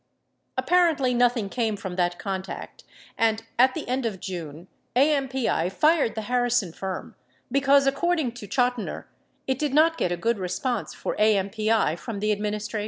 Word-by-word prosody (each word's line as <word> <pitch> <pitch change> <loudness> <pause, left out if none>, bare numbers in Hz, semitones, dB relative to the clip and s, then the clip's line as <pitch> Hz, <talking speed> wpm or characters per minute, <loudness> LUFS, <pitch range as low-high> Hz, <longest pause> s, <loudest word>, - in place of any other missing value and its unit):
28 - - +1
Apparently 325 -8 +3
nothing 245 -3 +2
came 220 0 -1
from 190 -2 -6
that 175 -1 0
contact 190 -1 -6 0.4
and, 225 0 +2 0.2
at 255 +1 +5
the - - -5
end 255 +1 -1
of 215 -5 -3
June, 170 -3 -7 0.3
AMPI 265 - +1
fired 305 - +2
the 220 - -3
Har 245 +2 +1
rison 230 -8 0
firm, 190 -1 -5 0.4
because, 275 +1 +4
according 280 0 +1
to 230 -3 -10
Chotiner, 245 +1 -1 0.4
it 265 -1 -1
did 295 -2 -1
not 325 +2 +4
get 175 - 0
a 175 - -1
good 225 +4 0
response 240 +7 -2
for - - -3
AMPI 215 -3 +2
from 200 +6 -5
the 210 +1 +1
administration. 210 +1 -2
230 Hz, 165 wpm, -25 LUFS, 195-265 Hz, 0.4 s, at